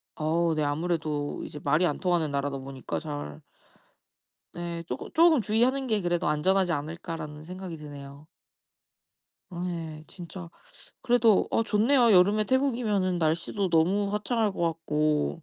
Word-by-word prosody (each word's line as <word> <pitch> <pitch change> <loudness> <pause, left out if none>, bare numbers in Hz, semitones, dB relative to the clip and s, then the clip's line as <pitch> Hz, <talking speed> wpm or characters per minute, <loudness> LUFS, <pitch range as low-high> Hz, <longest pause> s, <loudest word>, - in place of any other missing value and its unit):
어 165 +2 +1
네. 155 - 0
아무래도 150 -1 -2
이제 150 - -8
말이 150 +5 +3
안 150 - -1
통하는 175 -5 +1
나라다 140 0 -2
보니까 135 -1 -5
잘. 145 - -6 1.1
네. 170 -1 -5
조금 - - -6
'조금 325 -2 +5
주의하는 245 +6 +1
게 215 -3 +1
그래도 175 0 0
안전하지 180 +4 +2
않을까.'라는 155 0 -5
생각이 180 -1 -7
드네요. 145 0 -11 1.2
어 175 -1 -6
예. 160 -3 -5
진짜 175 -1 -9 0.5
그래도 235 -4 +4
어 225 - +2
좋네요. 230 +3 +3
여름에 200 +4 +5
태국이면은 220 -8 +1
날씨도 170 +5 0
너무 195 +5 +2
화창할 210 0 0
것 - - -7
같고. 155 -1 0
170 Hz, 305 characters per minute, -27 LUFS, 155-205 Hz, 1.2 s, 조금